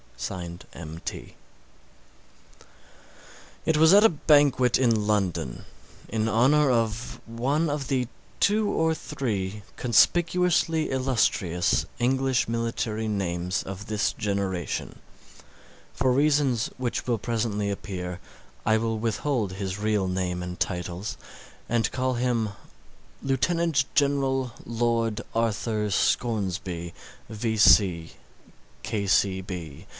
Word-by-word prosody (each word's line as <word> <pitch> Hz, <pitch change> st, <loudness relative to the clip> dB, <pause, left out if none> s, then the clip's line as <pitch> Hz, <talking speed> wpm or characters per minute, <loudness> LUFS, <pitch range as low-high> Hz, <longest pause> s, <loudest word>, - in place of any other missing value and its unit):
M.T.) 80 Hz, 0 st, -7 dB, 2.3 s
It 160 Hz, -, +2 dB
was 160 Hz, +2 st, +6 dB
at 205 Hz, +2 st, +7 dB
a 225 Hz, -, +8 dB
banquet 145 Hz, -5 st, +4 dB
in 115 Hz, -5 st, +2 dB
London 95 Hz, -, -1 dB, 0.4 s
in 110 Hz, 0 st, 0 dB
honour 135 Hz, +6 st, +4 dB
of 115 Hz, -1 st, -1 dB
one 140 Hz, +7 st, 0 dB
of 145 Hz, -2 st, -3 dB
the 125 Hz, -3 st, 0 dB, 0.3 s
two 210 Hz, +1 st, +3 dB
or 160 Hz, -4 st, +1 dB
three 105 Hz, -11 st, -3 dB
conspicuously 165 Hz, -, +3 dB
illustrious 115 Hz, -9 st, +1 dB
English 130 Hz, 0 st, +1 dB
military 115 Hz, -1 st, -2 dB
names 90 Hz, -3 st, -1 dB
of 95 Hz, +1 st, -7 dB
this 105 Hz, -1 st, 0 dB
generation. 100 Hz, -4 st, -3 dB, 0.9 s
For 130 Hz, 0 st, +1 dB
reasons 140 Hz, -3 st, +2 dB
which 125 Hz, -1 st, -3 dB
will 120 Hz, -2 st, +1 dB
presently 105 Hz, -2 st, -1 dB
appear, 90 Hz, -3 st, -5 dB, 0.4 s
I 110 Hz, -, +3 dB
will 115 Hz, 0 st, -1 dB
withhold 115 Hz, -1 st, -1 dB
his 95 Hz, 0 st, -4 dB
real 105 Hz, -2 st, +1 dB
name 90 Hz, -1 st, -2 dB
and 90 Hz, 0 st, -6 dB
titles, 90 Hz, +4 st, -3 dB, 0.5 s
and 115 Hz, -1 st, +1 dB
call 130 Hz, 0 st, 0 dB
him 120 Hz, -3 st, 0 dB, 0.7 s
Lieutenant 145 Hz, +2 st, +1 dB
General 135 Hz, -3 st, +1 dB
Lord 115 Hz, -1 st, 0 dB
Arthur 110 Hz, -1 st, 0 dB
Scoresby, 95 Hz, -6 st, -1 dB, 0.3 s
V. 105 Hz, -6 st, +3 dB
115 Hz, 95 wpm, -26 LUFS, 100-135 Hz, 2.3 s, a